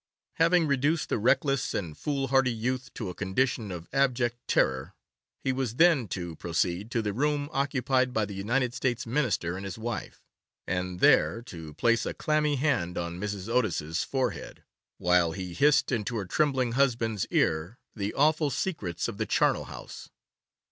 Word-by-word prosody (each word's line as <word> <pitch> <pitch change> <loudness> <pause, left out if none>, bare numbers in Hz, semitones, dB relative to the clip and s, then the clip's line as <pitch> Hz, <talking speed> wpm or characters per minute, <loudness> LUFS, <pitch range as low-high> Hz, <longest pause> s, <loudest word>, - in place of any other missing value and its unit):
Having 165 +1 +4
reduced 145 +3 +1
the - - 0
reckless 135 +4 +2
and 85 -6 -3
foolhardy 135 - +1
youth 125 +2 -3
to 105 - -4
a - - -5
condition 105 +3 -1
of 85 -1 -7
abject 125 -3 +2
terror, 65 0 +1 0.5
he 135 - +1
was 130 -3 -2
then 160 -6 +4
to 85 -2 -5
proceed 90 +4 -1
to 115 -3 -1
the 105 -1 -2
room 145 +4 0
occupied 130 -2 +1
by 110 -3 +1
the 100 - -8
United 120 +6 0
States 120 -1 -1
Minister 115 - 0
and 95 - -6
his 95 +1 -6
wife, 115 0 -5 0.4
and 90 -1 -3
there 115 - +4
to 80 - -9
place 115 0 +2
a - - -4
clammy 150 -1 +1
hand 130 - 0
on 85 0 -4
Mrs. 105 -1 -4
Otis's 95 -9 0
forehead, 130 -1 -3 0.3
while 90 -2 +3
he 90 0 -6
hissed 145 - +3
into 115 -1 -1
her 105 -3 -2
trembling 130 +2 +1
husband's 115 -5 +1
ear 80 +9 0 0.2
the 100 -1 -2
awful 155 +1 +3
secrets 105 - -2
of - - -6
the - - -1
charnel - - +2
house. - - -10
120 Hz, 160 wpm, -28 LUFS, 95-135 Hz, 0.5 s, Having